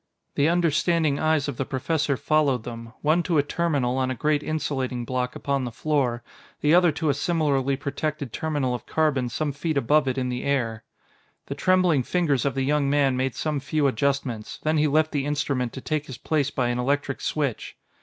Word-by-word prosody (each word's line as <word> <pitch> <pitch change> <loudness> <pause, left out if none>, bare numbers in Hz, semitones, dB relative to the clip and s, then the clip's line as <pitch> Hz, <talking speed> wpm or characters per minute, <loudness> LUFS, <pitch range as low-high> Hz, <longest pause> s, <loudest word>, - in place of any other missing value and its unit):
The 145 +3 +2
understanding 165 -3 +2
eyes 155 -2 +1
of 140 -4 -4
the - - 0
Professor 140 +2 -1
followed 145 -6 +1
them, 115 -1 -8
one 155 +4 +3
to 170 -2 0
a 145 - +4
terminal 145 -5 0
on 130 0 0
a 130 - -2
great 150 +4 +1
insulating 135 -6 -2
block 125 0 -2
upon 140 -1 -1
the 120 - -4
floor, 125 -3 0 0.4
the 150 +2 +3
other 175 -1 +6
to 155 +1 -1
a - - +4
similarly 140 -3 +1
protected 145 -2 -3
terminal 145 -5 -1
of 125 - -6
carbon 145 -6 +1
some 150 +4 -2
feet 150 +2 -2
above 145 +2 +3
it 130 0 -1
in 125 -1 -1
the 125 0 -3
air. 115 -6 -1 0.6
The - - -4
trembling 185 -6 +3
fingers 145 -2 0
of 140 - 0
the 135 - 0
young 145 0 +1
man 140 -2 +3
made 130 -1 -1
some 150 0 -1
few 145 +2 0
adjustments, 135 -3 -1
then 155 0 +2
he 155 - +3
left 155 +2 +2
the 145 -1 -1
instrument 140 -4 -1
to 130 - -7
take 155 +1 -2
his 130 - -7
place 145 -3 0
by 125 -3 -1
an 120 0 -1
electric 140 +1 -1
switch. 140 -7 -2
140 Hz, 200 wpm, -25 LUFS, 130-155 Hz, 0.6 s, other